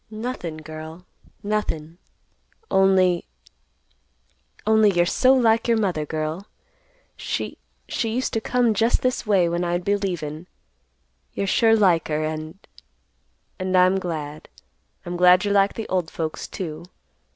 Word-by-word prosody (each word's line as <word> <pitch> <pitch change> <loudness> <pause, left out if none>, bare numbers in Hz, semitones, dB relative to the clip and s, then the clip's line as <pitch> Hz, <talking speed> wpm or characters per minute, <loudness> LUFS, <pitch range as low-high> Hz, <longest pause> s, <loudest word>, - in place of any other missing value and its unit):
"Nothin', 215 -7 -5
girl, 155 +3 -9 0.4
nothin'. 175 -6 -3 0.7
Only—only 185 -2 +3 1.7
you're 175 -2 +2
so 255 +8 +3
like 230 -2 +3
your 230 -1 +3
mother, 180 -8 -1
girl. 155 +6 -4 0.7
She—she 225 - -5
used 250 +4 -2
to 225 - 0
come 245 -1 +1
just 230 +2 +1
this 255 -3 -1
way 190 -5 +3
when 170 +1 -1
I'd 175 +1 -2
be 205 - +2
leavin'. 175 -5 -4 0.9
You're 200 - -2
sure 225 +3 +4
like 185 -7 +3
her, 155 0 -1
and—and 155 - -7
I'm 185 +1 +4
glad. 155 -4 -6 0.6
I'm 175 0 -4
glad 180 +2 +5
you're 205 - +1
like 200 0 +3
the 225 - -5
old 180 -3 -1
folks, 160 -1 -4
too. 170 -4 -6
180 Hz, 125 wpm, -23 LUFS, 160-210 Hz, 1.7 s, glad